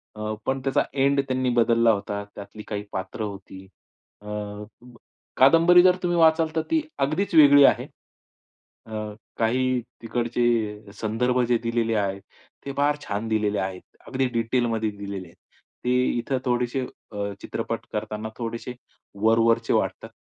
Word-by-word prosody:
अ, 110 0 -3
पण 135 0 -1
त्याचा 135 +1 +2
एंड 140 0 +3
त्यांनी 130 0 0
बदलला 115 0 +4
होता 100 0 -3
त्यातली 105 +1 -9
काही 105 -1 -4
पात्र 95 +3 -5
होती. 95 -2 -7 0.5
अ, 105 - -13 1.1
कादंबरी 165 +6 +7
जर 180 -1 +6
तुम्ही 175 -1 +1
वाचाल 160 0 +4
तर 160 - +2
ती 320 -1 +3 0.2
अगदीच 180 +6 -2
वेगळी 145 -2 +8
आहे. - - +3 1.0
अ, - - -13 0.5
काही 130 +3 +1 0.2
तिकडचे 115 -3 -1
संदर्भ 115 +4 0
जे 120 - +4
दिलेले 115 -1 0
आहेत 100 -2 -1 0.4
ते 140 - -4
फार 145 +1 +3
छान 105 0 -3
दिलेले 105 -2 0
आहेत. 95 -1 -4 0.3
अगदी 130 +1 0
डिटेलमध्ये 115 -1 0
दिलेले 100 -2 -7
आहेत. 85 - -19 0.5
ते 125 - +2 0.3
इथं 130 +3 -1
थोडेसे 125 +1 0 0.3
अ, 100 -1 -3
चित्रपट - - -4
करताना 110 +1 -4
थोडेसे 115 +1 -5 0.5
वरवरचे 115 +1 +3
वाटतात - - -1
115 Hz, 135 wpm, -24 LUFS, 105-135 Hz, 1.1 s, वेगळी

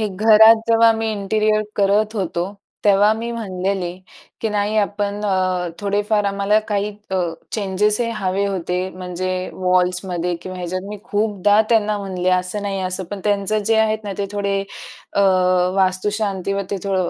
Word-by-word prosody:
हे 215 - +1
घरात 220 +3 +7
जेव्हा 230 0 +6
मी 225 0 -2
इंटेरिअर 215 +1 +1
करत 210 +2 +2
होतो. 185 +1 -2 0.3
तेव्हा 205 +1 +5
मी 230 +2 -4
म्हणलेले, 190 -4 -2 0.5
की 225 - -1
नाही 210 +1 -1
आपण 205 0 -1
अ, 185 -2 0
थोडेफार 205 +1 0
आम्हाला 200 +1 +2
काही 205 0 0 0.2
अ, 190 - 0 0.4
चेंजेस 210 +1 0
हे 235 - 0
हवे 195 0 -1
होते. 180 -1 -2
म्हणजे 185 0 -4 0.2
वॉल्समध्ये 180 -1 0
किंवा 185 0 -7
ह्याच्यात. 180 +1 -3
मी 210 0 -6
खूपदा 210 -2 +2
त्यांना 215 -2 +2
म्हणले, 185 -2 -3
"असं 185 +3 0
नाही, 195 -1 -2
असं." 185 0 -3
पण 205 -1 -5
त्यांचं 205 +1 +1
जे 225 +2 +2
आहेत 220 0 +1
ना, 200 - -4
ते 200 - -1
थोडे 200 -1 -1 0.5
अ, 200 - +1 0.5
वास्तुशांतवरती 195 0 -1
थो 195 -1 0
200 Hz, 150 wpm, -20 LUFS, 185-210 Hz, 0.5 s, घरात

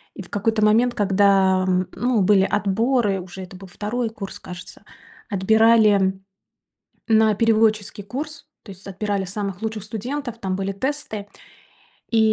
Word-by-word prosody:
и - - -7
в 175 - -16
какой-то 215 +1 0
момент, 235 +3 +3
когда, 195 -2 +3
м, 185 0 +1
ну 245 -3 +1
были 195 0 +4
отборы, 210 +1 +1
уже 180 +1 -10
это 185 0 -10
был 190 +1 -11
2 215 +6 -3
курс, 205 -3 -8
кажется, 180 +1 -10 0.5
отбирали 210 -1 +4 0.9
на 220 -1 +4
переводческий 215 -2 +1
курс. 285 +7 -6 0.2
То 205 - -12
есть 190 +1 -13
отбирали 200 0 -2
самых 195 0 -5
лучших 220 -1 -3
студентов, 240 +4 -5
там 190 -4 -3
были 195 0 -2
тесты. 260 -2 -4 0.9
И 230 - +3
205 Hz, 140 wpm, -22 LUFS, 195-225 Hz, 0.9 s, были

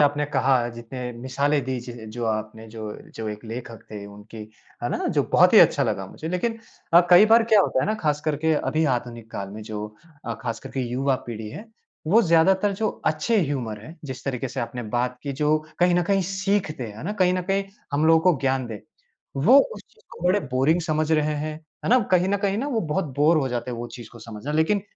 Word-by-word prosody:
आपने 145 0 +3
कहा, 130 0 +3 0.2
जितने 120 +2 -8
मिसालें 140 +4 0
दी 130 -1 -2
ज 120 0 -9 0.2
जो 120 +2 -4
आपने 110 0 -3
जो 110 0 -9 0.3
जो 110 - -5
एक 105 +2 -7
लेखक 115 0 -7
थे 105 -1 -7
उनकी, 105 +2 -12 0.4
है - - 0
ना? - - -1
जो - - +2
बहुत - - +6
ही - - +10
अच्छा - - +5
लगा 95 - -1
मुझे। 160 - -7
लेकिन 225 +6 -1 0.3
अ, 170 - +9
कई 180 +4 +8
बार 230 +1 +7
क्या 215 -2 +7
होता 130 - +1
है - - -1
ना, 215 - +1
ख़ास 150 -8 -1
करके 155 +1 +1
अभी 155 +1 0
आधुनिक 120 -2 -6
काल 100 -2 -5
में 105 +2 -8
जो 105 -1 -5 0.4
अ, 115 - -3
ख़ास 115 -2 -3
कर - - -9
के 135 - -3
युवा 135 +2 +1
पीढ़ी 110 -2 -6
है, 210 - -9 0.4
वो 215 +9 +5
ज़्यादातर 190 +3 +3
जो 220 - +2 0.2
अच्छे 155 +9 +1
ह्यूमर 125 - -3
है, 160 +8 -11
जिस 130 -3 -7
तरीक़े 135 -1 -2
से - - -4
आपने 120 +1 -4
बात 125 +1 -1
की 140 - -3
जो 150 +1 +3 0.2
कहीं 180 0 +4
न 175 - +3
कहीं 195 +2 +1
सीखते 190 -6 -1
हैं, 105 -2 -8
है 110 - -8
ना? 200 - -2
कहीं 185 -3 +2
न 185 - -1
कहीं 195 0 +1 0.3
हम 150 +2 +2
लोगों 160 0 +6
को 150 - -3
ज्ञान 130 -2 0
दें, 110 -3 -6 0.6
वो 220 - +6
उस 475 - -4
चीज़ 450 - -27
को 170 - -10
बड़े 190 +3 +3
बोरिंग 140 +7 +3
समझ 155 -1 -1
रहे 155 -1 +2
हैं, 155 +1 -3 0.3
है - - -1
ना? 255 - +7
कहीं 185 0 +3
न 200 - +2
कहीं 200 +1 +1
ना 265 - -2
वो 235 -6 0
बहुत 190 - +1
बोर 155 +4 +4
हो 135 -3 0
जाते 120 0 -3
हैं 120 - -5
वो 120 - -4
चीज़ 120 -3 -9
को 120 - -13
समझना। 115 +5 -7
लेकिन 160 +7 +2
145 Hz, 235 wpm, -24 LUFS, 120-175 Hz, 0.6 s, ही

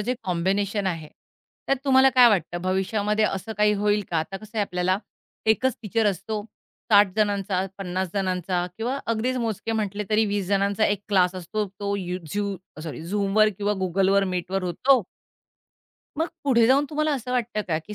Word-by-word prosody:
जे 245 +5 -1
कॉम्बिनेशन 195 +3 0
आहे, 165 -4 -3 0.6
त्यात 275 - +2
तुम्हाला 265 -1 +6
काय 250 -2 +8
वाटतं 180 -4 0
भविष्यामध्ये 205 +3 0
असं 200 +2 -2
काही 210 0 +4
होईल 205 0 +1
का, 165 - +1
आता 175 +5 -3
कसंय 215 +1 -5
आपल्याला 185 -1 0 0.5
एकच 235 +3 +2
टीचर 220 +1 0
असतो 210 +2 -4 0.5
60 205 -1 +7
जणांचा, 200 -3 +1
50 185 -1 -2
जणांचा 185 -2 -1
किंवा 245 +5 -2
अगदीच 230 +3 0
मोजके 225 -1 -2
म्हटले, 210 -1 -2
तरी 215 +1 +4
20 200 -2 -1
जणांचा 200 +2 +2
1 205 -1 0
क्लास 185 -2 +3
असतो. 200 +4 -3
तो 200 0 -1
यु 180 -1 -3 0.2
झू 200 -2 -1 0.3
सॉरी, 160 -1 -6
Zoomवर 210 +1 +3
किंवा 205 0 +1
Googleवर 195 +2 +2
मीटवर 185 +1 -2
होतो. 250 +9 +3 1.2
मग 325 - +1 0.2
पुढे 235 -4 +4
जाऊन 275 +3 +4
तुम्हाला 305 0 0
असं 250 -2 -4
वाटतं 240 -3 -1
का, 155 -1 +1
की 210 +6 -9
205 Hz, 165 wpm, -24 LUFS, 185-220 Hz, 1.2 s, काय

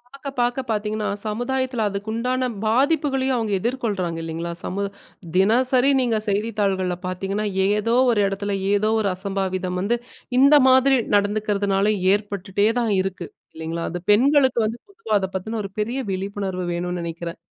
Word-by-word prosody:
பாக்க 275 0 -6
பாக்க 245 +2 +1
பாத்தீங்கன்னா, 215 0 -1 0.2
சமுதாயத்தில 245 +1 -1
அதுக்கு 200 +2 -5
உண்டான 255 +2 0 0.2
பாதிப்புகளையும் 270 +2 +2
அவுங்க 220 -3 -2
எதிர்கொள்றாங்க 205 -8 -2
இல்லைங்களா? 165 +1 -4
சமூ 200 +2 -3 0.5
தினசரி 250 +7 +4
நீங்க 235 -3 +1
செய்தித்தாள்கள்ல 200 -3 0
பாத்தீங்கன்னா, 195 +3 -2 0.2
ஏதோ 210 +3 +1 0.2
ஒரு 210 -3 +2
எடத்துல, 200 0 -2 0.2
ஏதோ 215 +1 +2
ஒரு 200 - +1
அசம்பாவிதம் 185 -1 -2
வந்து, 235 +5 +1 0.4
இந்த 280 +2 +7
மாதிரி 260 +1 +5 0.2
நடந்துக்கிறதுனால 205 0 +1 0.2
ஏற்பட்டுட்டே 205 0 0
தான் 230 -3 0
இருக்கு, 190 -2 -4 0.3
இல்லைங்களா? 165 +1 -4
அது 175 -1 -5
பெண்களுக்கு 260 +1 +4
வந்து 230 +2 -5
பொதுவா 345 - -3
அத 190 -1 -3
பத்தின 220 +4 -3
ஒரு 195 - -7
பெரிய 235 +5 -1
விழிப்புணர்வு 190 -1 -3
வேணும்னு 180 +1 -3
நெனைக்கிறேன். 170 0 -5
210 Hz, 135 wpm, -22 LUFS, 190-240 Hz, 0.5 s, இந்த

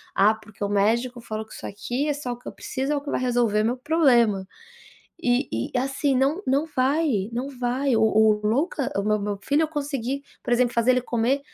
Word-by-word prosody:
"Ah, 205 +3 +5
porque 220 -2 -10
o 200 - -1
médico 235 +5 +1
falou 220 -1 -5
que 215 - -15
isso - - -9
aqui 245 +8 -3
é - - +2
só 280 -4 -5
o 240 - -5
que - - -14
eu - - -4
preciso, 270 +2 -3
é - - +1
o 285 - -2
que 285 - -6
vai - - 0
resolver 240 -4 +2
meu 240 +3 0
problema". 245 - +3 0.8
E 245 +2 +1 0.2
e, - - 0
assim, 270 +1 0
não 280 +9 +1
não 275 +4 +2
vai, 260 -6 +1
não 245 +4 -3
vai. 255 +1 0
O 220 - +3
o 220 0 +5
Luca, 275 - 0
o 200 - +1
meu 215 0 +1
meu 205 0 -3
filho 285 +9 +1
eu 310 - 0
consegui, 280 -3 -3 0.2
por - - -2
exemplo, 245 0 +2
fazer 235 +1 +3
ele 255 0 +3
comer 245 +3 0
245 Hz, 225 wpm, -24 LUFS, 220-275 Hz, 0.8 s, Ah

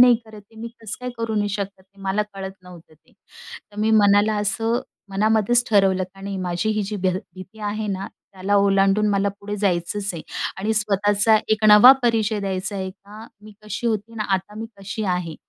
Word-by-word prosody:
नाही 245 -1 +8
करत. 220 -1 -12
ते 225 - -20
मी 230 - -5
कसं 220 -1 -5
काय 250 0 -4
करू 230 -1 -2
नाही 205 -1 +1
शकत? 200 -1 -4
ते 195 +1 -23
मला 195 +2 0
कळत 195 0 -6
नव्हतं 175 -3 -15
ते. 155 - -30 0.6
तर - - -16
मी 220 +1 +2
मनाला 205 +1 +4
असं 225 +3 0 0.3
मनामध्येच 220 +4 +2
ठरवलं 195 -3 +3
आणि 195 0 -6
माझी 180 +3 -1
ही 215 -1 0
जी 205 +1 -4
भी 190 -1 0 0.3
भीती 185 +3 -12
आहे 210 +1 -3
ना 195 0 -3
त्याला 195 +1 -5
ओलांडून 195 +1 +3
मला 200 0 +1
पुढे 205 +1 -5
जायचंच 195 +1 -1
आहे. 160 - -6 0.4
आणि 215 +3 -1
स्वतःचा 205 +1 +3
एक 215 0 +1
नवा 210 +5 +10
परिचय 220 -3 +1
द्यायचा 195 +1 -3
आहे 190 -1 -3
का, 205 +3 -13 0.2
मी 215 0 -13
कशी 215 +3 -4
होती 225 0 -2
ना, 215 -1 -3
आता 190 +2 -4
मी 225 - -5
कशी 200 +2 -5
आहे. 180 -4 -2
205 Hz, 195 wpm, -22 LUFS, 195-215 Hz, 0.6 s, नवा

